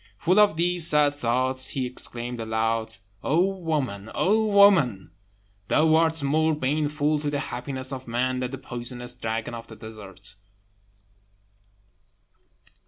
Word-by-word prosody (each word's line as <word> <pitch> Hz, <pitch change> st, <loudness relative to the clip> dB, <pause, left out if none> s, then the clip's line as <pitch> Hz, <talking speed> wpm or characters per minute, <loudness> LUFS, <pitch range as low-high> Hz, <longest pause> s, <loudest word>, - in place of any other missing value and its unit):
Full 185 Hz, +4 st, +2 dB
of 205 Hz, -6 st, +4 dB
these 175 Hz, -1 st, +3 dB
sad 150 Hz, -3 st, +4 dB
thoughts, 130 Hz, 0 st, +2 dB
he 130 Hz, -2 st, -2 dB
exclaimed 120 Hz, -1 st, -5 dB
aloud, 110 Hz, 0 st, -2 dB, 0.3 s
"O 165 Hz, +6 st, +2 dB
woman, 150 Hz, -, -3 dB
woman! 200 Hz, -, +3 dB, 0.6 s
thou 155 Hz, +7 st, +3 dB
art 160 Hz, -1 st, +2 dB
more 155 Hz, +3 st, +1 dB
baneful 150 Hz, +1 st, 0 dB
to 145 Hz, 0 st, -2 dB
the 145 Hz, -, -2 dB
happiness 130 Hz, 0 st, -4 dB
of 130 Hz, -1 st, -8 dB
man 125 Hz, +2 st, -1 dB
than 125 Hz, -1 st, -3 dB
the 135 Hz, -, -6 dB
poisonous 120 Hz, -1 st, -5 dB
dragon 115 Hz, -1 st, -4 dB
of 115 Hz, 0 st, -8 dB
the 110 Hz, -, -11 dB
desert!" 105 Hz, -2 st, -12 dB
130 Hz, 125 wpm, -25 LUFS, 120-155 Hz, 0.6 s, of